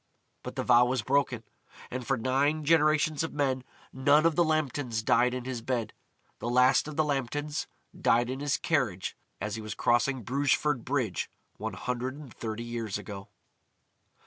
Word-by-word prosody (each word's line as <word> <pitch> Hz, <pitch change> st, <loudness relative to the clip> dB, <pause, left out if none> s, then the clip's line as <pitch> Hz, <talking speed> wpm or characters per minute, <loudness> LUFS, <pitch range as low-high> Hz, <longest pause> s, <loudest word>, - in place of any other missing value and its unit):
But -, -, -7 dB
the -, -, -1 dB
vow 120 Hz, +1 st, +6 dB
was 125 Hz, -2 st, 0 dB
broken, 130 Hz, -2 st, +1 dB, 0.5 s
and 125 Hz, -1 st, -5 dB
for 135 Hz, -1 st, +2 dB
nine 140 Hz, +6 st, +1 dB
generations 155 Hz, -1 st, +3 dB
of 165 Hz, -, -3 dB
men 135 Hz, -3 st, 0 dB, 0.3 s
none 145 Hz, +4 st, +4 dB
of 165 Hz, -2 st, +3 dB
the 175 Hz, -, +4 dB
Lambtons 145 Hz, -8 st, -1 dB
died 125 Hz, +3 st, +3 dB
in 125 Hz, -1 st, -5 dB
his 130 Hz, -3 st, -4 dB
bed. 120 Hz, -3 st, -2 dB, 0.5 s
The 120 Hz, -, -3 dB
last 125 Hz, +3 st, +4 dB
of 155 Hz, -, -6 dB
the 155 Hz, -, +3 dB
Lambtons 145 Hz, +1 st, -2 dB, 0.3 s
died 120 Hz, +1 st, +3 dB
in 130 Hz, +2 st, -4 dB
his 140 Hz, -1 st, 0 dB
carriage 120 Hz, -, -1 dB, 0.2 s
as 105 Hz, +1 st, -3 dB
he -, -, -5 dB
was 110 Hz, 0 st, -6 dB
crossing 120 Hz, +1 st, +2 dB
Brugeford 140 Hz, +1 st, +1 dB
Bridge, 125 Hz, -9 st, -1 dB, 0.3 s
one 110 Hz, -1 st, -4 dB
hundred 125 Hz, +6 st, -3 dB
and 145 Hz, -5 st, -11 dB
thirty 110 Hz, 0 st, -5 dB
years 115 Hz, -4 st, -3 dB
ago. 100 Hz, -1 st, -8 dB
130 Hz, 170 wpm, -29 LUFS, 120-145 Hz, 0.5 s, vow